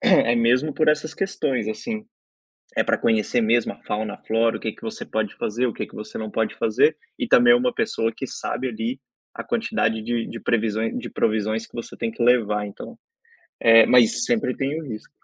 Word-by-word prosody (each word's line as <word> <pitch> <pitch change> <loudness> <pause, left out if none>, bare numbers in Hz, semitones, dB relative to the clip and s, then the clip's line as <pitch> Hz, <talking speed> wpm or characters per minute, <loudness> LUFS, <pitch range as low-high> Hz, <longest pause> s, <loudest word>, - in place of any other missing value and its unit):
é 120 +1 +4
mesmo 125 +6 +2
por 155 - +1
essas 150 +1 +1
questões, 135 - -1
assim, 215 - -5 0.7
é - - +4
pra - - +1
conhecer 115 +2 +1
mesmo 115 +1 +2
a - - -22
fauna, 105 0 -3
a - - -13
flora, 115 0 +2
o - - -14
que 110 - -3
que - - -19
você 225 +1 -6
pode 110 - -2
fazer, 120 +4 -1
o 115 - -3
que - - -4
que - - -16
você 105 - -7
não 110 -1 -5
pode 110 - -1
fazer. 125 +8 +2 0.2
E 255 - -1
também 245 0 +6
é - - +7
uma 250 0 0
pessoa 165 - 0
que 135 - -5
sabe 130 0 -4
ali 115 +3 -4 0.3
a - - -6
quantidade 225 - -1
de 115 +1 -2
de 115 - -7
previsões 110 -1 0
de - - -5
provisões 110 +1 -1
que - - -32
você 120 - -7
tem 115 - -2
que 115 +1 -3
levar. 105 -4 +3
Então, 100 - -9 0.6
eh, 115 -1 +8
mas 125 - +4
sempre 225 - 0
tem 140 +4 -1
o - - -9
risco. 110 -3 -7
115 Hz, 215 wpm, -23 LUFS, 110-150 Hz, 0.7 s, eh